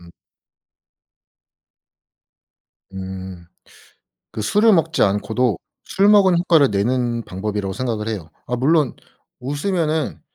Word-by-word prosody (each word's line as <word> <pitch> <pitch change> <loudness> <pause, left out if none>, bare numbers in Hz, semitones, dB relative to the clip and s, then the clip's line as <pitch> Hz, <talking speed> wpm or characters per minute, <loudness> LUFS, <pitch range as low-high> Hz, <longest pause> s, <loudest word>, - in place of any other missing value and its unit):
음. 85 -1 -15 2.8
음. 95 -2 -8 0.9
그 110 - -4
술을 210 - +3
먹지 165 -2 +2
않고도 110 +2 +1 0.3
술 195 +2 +2
먹은 195 -4 +5
효과를 160 - +3
내는 120 +3 0
방법이라고 100 +1 -4
생각을 115 -3 -3
해요. 90 -7 -5 0.2
아 125 - -2
물론 145 +1 +2 0.5
웃으면은 155 +2 -2
125 Hz, 205 characters per minute, -20 LUFS, 100-160 Hz, 2.8 s, 먹은